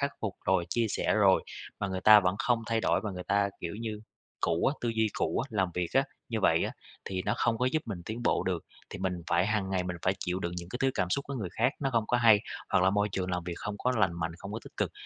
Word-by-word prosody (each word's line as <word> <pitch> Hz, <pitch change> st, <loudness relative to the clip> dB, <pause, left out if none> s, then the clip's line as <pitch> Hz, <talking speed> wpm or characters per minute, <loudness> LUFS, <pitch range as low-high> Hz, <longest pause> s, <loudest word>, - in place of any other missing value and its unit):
khắc 140 Hz, 0 st, +1 dB
phục 105 Hz, -4 st, -2 dB
rồi, 95 Hz, -3 st, +2 dB
chia 115 Hz, -1 st, +1 dB
sẻ -, -, 0 dB
rồi, -, -, +5 dB, 0.4 s
mà 100 Hz, -, -1 dB
người 95 Hz, -1 st, -3 dB
ta 105 Hz, +2 st, +9 dB
vẫn 90 Hz, 0 st, +1 dB
không 120 Hz, -2 st, +1 dB
thay 115 Hz, -1 st, +1 dB
đổi -, -, +2 dB
và 105 Hz, -1 st, -3 dB
người 90 Hz, -1 st, -6 dB
ta, 100 Hz, 0 st, +2 dB
kiểu 85 Hz, -, -4 dB
như, 110 Hz, -2 st, -4 dB, 0.4 s
cũ 85 Hz, 0 st, +1 dB
á, 140 Hz, -, +2 dB
tư 120 Hz, -, -1 dB
duy 110 Hz, -1 st, +1 dB
cũ -, -, 0 dB
á, 140 Hz, -, -2 dB
làm 95 Hz, -4 st, +1 dB
việc 90 Hz, -2 st, -1 dB
á, -, -, +6 dB, 0.3 s
như -, -, -2 dB
vậy -, -, +3 dB
á, -, -, -3 dB, 0.3 s
thì 95 Hz, -1 st, -3 dB
nó -, -, +1 dB
không 115 Hz, -1 st, +1 dB
có 125 Hz, -, +2 dB
giúp 155 Hz, -, +1 dB
mình 95 Hz, -6 st, -5 dB
tiến 115 Hz, +5 st, -5 dB
bộ -, -, +2 dB
được. 90 Hz, -3 st, -1 dB, 0.3 s
Thì -, -, -6 dB
mình 95 Hz, -1 st, -1 dB, 0.2 s
phải 85 Hz, +2 st, +3 dB
hàng 105 Hz, -3 st, 0 dB
ngày 95 Hz, -1 st, +1 dB
mình 90 Hz, -1 st, -3 dB
phải 95 Hz, +1 st, +2 dB
chịu 90 Hz, 0 st, -2 dB
đựng 85 Hz, -2 st, -3 dB
những 85 Hz, 0 st, -6 dB
cái 125 Hz, -, -5 dB
thứ 135 Hz, -, +4 dB
cảm 90 Hz, -1 st, 0 dB
xúc 140 Hz, -, 0 dB
của 140 Hz, -, -3 dB
người 105 Hz, -8 st, -3 dB
khác, 125 Hz, +5 st, +3 dB
nó 135 Hz, -, 0 dB
không 115 Hz, -4 st, +1 dB
có 125 Hz, -, +2 dB
hay, 115 Hz, -4 st, +6 dB, 0.3 s
hoặc 95 Hz, -1 st, +4 dB
là 95 Hz, -, +5 dB
môi 105 Hz, +1 st, +1 dB
trường 95 Hz, -1 st, -2 dB
làm 90 Hz, -1 st, -2 dB
việc 90 Hz, -, -4 dB
không 105 Hz, 0 st, -5 dB
có 125 Hz, -, +1 dB
lành 95 Hz, -5 st, +3 dB
mạnh, 85 Hz, 0 st, -1 dB
không 100 Hz, +1 st, -8 dB
có 110 Hz, -, -3 dB
tích -, -, -14 dB
cực, -, -, 0 dB
100 Hz, 295 wpm, -30 LUFS, 90-115 Hz, 0.4 s, ta